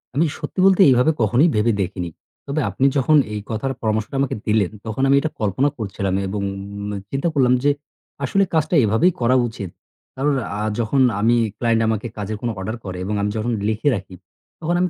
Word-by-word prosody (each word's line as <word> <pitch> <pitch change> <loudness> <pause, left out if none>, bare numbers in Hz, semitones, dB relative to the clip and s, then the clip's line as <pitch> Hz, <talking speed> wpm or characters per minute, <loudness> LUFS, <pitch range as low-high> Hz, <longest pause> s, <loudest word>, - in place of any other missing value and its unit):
আমি 155 +4 +3
সত্যি - - -5
বলতে 195 0 +5
এইভাবে 130 +5 +4
কখনোই 125 - +4
ভেবে 110 +2 +3
দেখিনি। 90 -2 -3 0.4
তবে 145 +2 -1
আপনি 130 +8 0
যখন 150 +3 +4 0.2
এই 105 - -2
কথার 125 +5 -2
পরামর্শটা 110 +2 -1
আমাকে 140 - 0
দিলেন, 105 -3 +2
তখন 110 +4 -3
আমি 135 - +5
এটা 155 - -2
কল্পনা 110 +7 +1
করছিলাম 100 -3 -3
এবং 100 +1 -3 0.7
চিন্তা 135 +4 -1
করলাম 130 -4 +3
যে, 145 - +4 0.5
আসলে 195 +9 +2
কাজটা 160 +1 +1
এভাবেই 115 - +3
করা 125 +2 +3
উচিত। 105 -5 -7 0.5
কারণ 140 +2 +1 0.3
আ - - -2 0.2
যখন 120 +4 +1 0.2
আমি 115 +3 +3 0.2
client 115 -1 +1
আমাকে 110 +1 -1
কাজের 105 +1 -4
কোনো 120 - -1
order 110 +4 -3
করে 90 -1 -5
এবং 105 +2 -2
আমি 105 - 0
যখন 120 +3 -1 0.2
লিখে 110 +6 +1
রাখি, 95 -2 -7 0.4
তখন 170 +1 -1
আমি 180 - +2
115 Hz, 185 wpm, -21 LUFS, 105-140 Hz, 0.7 s, বলতে